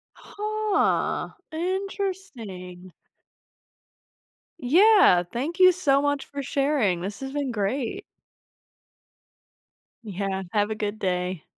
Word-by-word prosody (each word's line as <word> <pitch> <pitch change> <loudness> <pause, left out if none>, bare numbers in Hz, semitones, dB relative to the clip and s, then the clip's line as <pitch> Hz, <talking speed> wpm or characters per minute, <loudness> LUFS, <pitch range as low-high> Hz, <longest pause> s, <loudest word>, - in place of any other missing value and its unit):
Huh, 425 0 -1 0.2
interesting. 320 - -5 1.7
Yeah. 340 - +5
Thank 295 +10 -3
you 370 0 +8
so 290 -7 +2
much 285 -1 -1
for 280 -1 -6
sharing, 270 - +1
this 200 +2 -5
has 270 - -5
been 285 -2 -2
great. 235 - -2 2.0
Yeah. 195 -2 -3
Have 205 -1 +1
a 220 - -2
good 215 0 -4
day. 180 -3 -2
270 Hz, 95 wpm, -25 LUFS, -, 2.0 s, you